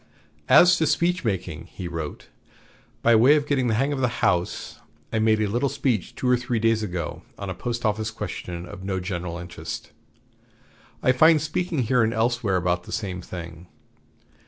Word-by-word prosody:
"As 175 Hz, 0 st, +7 dB
to 160 Hz, -, +1 dB
speech 175 Hz, +4 st, +1 dB
making," 90 Hz, -6 st, -3 dB
he 90 Hz, 0 st, -7 dB
wrote, 80 Hz, -3 st, -6 dB, 0.7 s
"by 115 Hz, 0 st, +6 dB
way 125 Hz, +7 st, +6 dB
of 145 Hz, -1 st, +1 dB
getting 135 Hz, -4 st, +1 dB
the 110 Hz, -, +1 dB
hang 135 Hz, +5 st, +1 dB
of 140 Hz, -, -3 dB
the 120 Hz, -1 st, -1 dB
House, 90 Hz, 0 st, -1 dB, 0.3 s
I 110 Hz, -, +1 dB
made 110 Hz, 0 st, +3 dB
a 110 Hz, -, +2 dB
little 120 Hz, +7 st, 0 dB
speech 130 Hz, -8 st, -1 dB
two 130 Hz, -, -2 dB
or 125 Hz, -, +5 dB
three 125 Hz, -1 st, -2 dB
days 115 Hz, 0 st, +2 dB
ago 90 Hz, -5 st, -4 dB, 0.2 s
on 100 Hz, -2 st, -5 dB
a -, -, -3 dB
post 120 Hz, +5 st, -4 dB
office 110 Hz, +1 st, 0 dB
question 90 Hz, -5 st, -6 dB
of 95 Hz, +1 st, -10 dB
no 95 Hz, -1 st, -2 dB
general 90 Hz, -2 st, -4 dB
interest. 85 Hz, 0 st, -7 dB, 1.1 s
I 130 Hz, -, +5 dB
find 155 Hz, +5 st, +6 dB
speaking 155 Hz, 0 st, -1 dB
here 125 Hz, +2 st, +2 dB
and 115 Hz, 0 st, +1 dB
elsewhere 115 Hz, -3 st, +1 dB
about 90 Hz, -1 st, 0 dB
the -, -, -10 dB
same 95 Hz, -4 st, -3 dB
thing. 85 Hz, -1 st, -9 dB
110 Hz, 180 wpm, -24 LUFS, 90-125 Hz, 1.1 s, As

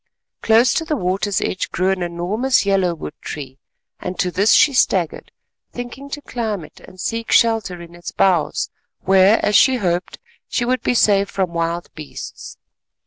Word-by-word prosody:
Close 230 Hz, +2 st, +4 dB
to 325 Hz, -, 0 dB
the 320 Hz, -1 st, -2 dB
water's 195 Hz, -1 st, -1 dB
edge 185 Hz, -, -2 dB
grew 185 Hz, +2 st, 0 dB
an 190 Hz, -1 st, -2 dB
enormous 185 Hz, +9 st, 0 dB
yellow 190 Hz, -3 st, +1 dB
wood 150 Hz, -, -7 dB
tree, 135 Hz, -3 st, -7 dB, 0.4 s
and 180 Hz, 0 st, -5 dB
to 180 Hz, -, 0 dB
this 200 Hz, +5 st, +2 dB
she 285 Hz, -, +5 dB
staggered—thinking 245 Hz, -, -3 dB
to 290 Hz, +1 st, -6 dB
climb 215 Hz, -8 st, -3 dB
it, 150 Hz, -, -17 dB
and 185 Hz, -, -16 dB
seek 230 Hz, +4 st, -3 dB
shelter 225 Hz, -6 st, +2 dB
in 170 Hz, 0 st, -11 dB
its 175 Hz, 0 st, -8 dB
boughs 180 Hz, -5 st, +1 dB, 0.3 s
where, 195 Hz, +3 st, +5 dB
as 210 Hz, -, +1 dB
she 265 Hz, +3 st, +6 dB
hoped, 180 Hz, -6 st, -2 dB, 0.3 s
she 245 Hz, -, -1 dB
would 255 Hz, +1 st, 0 dB
be 245 Hz, -, 0 dB
safe 200 Hz, -3 st, +3 dB
from 185 Hz, -3 st, -2 dB
wild 170 Hz, +1 st, -2 dB
beasts. 155 Hz, -2 st, -9 dB
195 Hz, 165 wpm, -20 LUFS, 175-230 Hz, 0.4 s, she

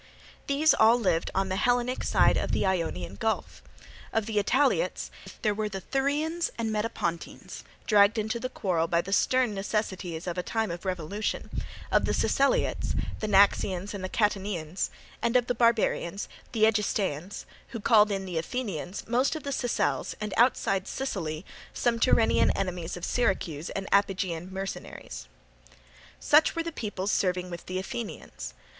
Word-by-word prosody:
These 290 Hz, +3 st, +4 dB
all 225 Hz, +2 st, +5 dB
lived 175 Hz, -7 st, +1 dB
on 195 Hz, 0 st, +1 dB
the 185 Hz, -, -1 dB
Hellenic 245 Hz, +3 st, +1 dB
side -, -, +4 dB
of -, -, -1 dB
the -, -, +1 dB
Ionian 100 Hz, -, -1 dB
Gulf. 220 Hz, -, -2 dB, 0.5 s
Of 225 Hz, -1 st, 0 dB
the 220 Hz, -1 st, -3 dB
Italiots, 275 Hz, -, +1 dB, 0.3 s
there 210 Hz, -2 st, +3 dB
were 210 Hz, 0 st, -2 dB
the 195 Hz, -1 st, -5 dB
Thurians 295 Hz, -, 0 dB
and 225 Hz, -1 st, -1 dB
Metapontines, 210 Hz, -6 st, -3 dB, 0.2 s
dragged 205 Hz, +1 st, +5 dB
into 220 Hz, +2 st, -1 dB
the 255 Hz, -, -3 dB
quarrel 175 Hz, -9 st, 0 dB
by 170 Hz, 0 st, +2 dB
the 195 Hz, +3 st, -4 dB
stern 255 Hz, 0 st, +3 dB
necessities 195 Hz, -4 st, -3 dB
of 180 Hz, 0 st, -3 dB
a -, -, +1 dB
time 220 Hz, +1 st, -1 dB
of 175 Hz, +3 st, -7 dB
revolution; 185 Hz, +3 st, -3 dB, 0.4 s
of -, -, +4 dB
the -, -, 0 dB
Siceliots, 275 Hz, 0 st, +1 dB, 0.2 s
the 215 Hz, -, -2 dB
Naxians 200 Hz, -1 st, +3 dB
and 200 Hz, -2 st, -5 dB
the 185 Hz, -, -3 dB
Catanians; 195 Hz, -6 st, -1 dB, 0.3 s
and 235 Hz, +1 st, 0 dB
of 245 Hz, -1 st, +4 dB
the 245 Hz, -, 0 dB
barbarians, 225 Hz, -5 st, +1 dB, 0.2 s
the 220 Hz, -2 st, +4 dB
Egestaeans, 200 Hz, -5 st, -1 dB, 0.2 s
who 230 Hz, -, -6 dB
called 210 Hz, 0 st, +5 dB
in 195 Hz, -1 st, -2 dB
the 175 Hz, -3 st, -2 dB
Athenians, 190 Hz, -, -4 dB
most 250 Hz, +6 st, +2 dB
of 315 Hz, -, -6 dB
the 280 Hz, -, -3 dB
Sicels, 145 Hz, -, -1 dB
and 210 Hz, -2 st, -4 dB
outside 195 Hz, -5 st, +2 dB
Sicily 175 Hz, -10 st, -3 dB, 0.3 s
some 235 Hz, -1 st, +1 dB
Tyrrhenian 230 Hz, -1 st, +4 dB
enemies 180 Hz, -3 st, -3 dB
of 175 Hz, -, -4 dB
Syracuse 180 Hz, -9 st, -1 dB
and 195 Hz, 0 st, -4 dB
Iapygian 185 Hz, -3 st, +1 dB
mercenaries. 185 Hz, -, -6 dB, 0.9 s
Such 300 Hz, +2 st, +4 dB
were 330 Hz, -, -1 dB
the 335 Hz, -, -4 dB
peoples 205 Hz, -, -3 dB
serving 180 Hz, -1 st, 0 dB
with 170 Hz, -, -8 dB
the 185 Hz, -, -3 dB
Athenians. 205 Hz, +4 st, -6 dB
205 Hz, 155 wpm, -28 LUFS, 180-230 Hz, 0.9 s, all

